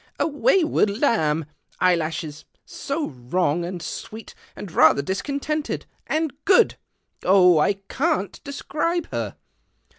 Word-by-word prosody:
" - - -38
A - - +2
wayward 325 - +2
lamb. 160 - +1 0.3
Eyelashes, 160 -3 0 0.2
So 295 +2 -4
wrong, 145 +6 -1
md 175 0 -5
sweet, 215 +8 -7 0.2
and 195 - -8
rather 160 -3 +5
discontented, 285 - -3 0.2
and 315 -3 -1
good! 400 +4 +5 0.5
Jh! 180 -3 +6
I 200 - +3
can't 300 - -1
describe 310 +4 -2
her 115 -4 -3
195 Hz, 115 wpm, -23 LUFS, -, 0.5 s, Jh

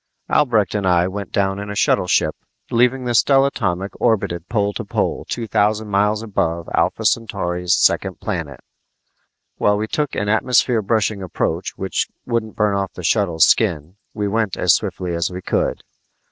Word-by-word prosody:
Albrecht 115 -10 +2
and 100 -3 -1
I 90 -1 +3
went 100 0 -6
down 95 -1 0
in 100 0 -6
a 105 - -5
shuttleship, 90 -7 +2 0.4
leaving 125 +2 +2
the 120 - -1
stellatomic 115 -8 +2
orbited 95 -7 0
pole 105 -3 0
to - - -4
pole - - -2
two 120 - -3
thousand 105 +1 +1
miles 105 +2 +1
above 85 -6 -2
Alpha - - 0
Centauri's 90 -6 0
second - - +2
planet. 75 -7 -4 1.0
While 105 0 +2
we 105 - -1
took 150 +3 -2
an 105 - -1
atmosphere 115 +2 +2
brushing 105 -1 0
approach 95 -3 -3
which - - -1 0.2
wouldn't 115 -2 -2
burn 105 -2 +1
off 100 -1 -2
the 90 - -9
shuttle's 85 -3 +3
skin, 90 -4 +1 0.2
we 105 -1 -1
went 110 -2 -1
as - - +4
swiftly 90 -2 -2
as 85 -1 0
we 90 0 -6
could. - - -1
105 Hz, 160 wpm, -20 LUFS, 90-110 Hz, 1.0 s, as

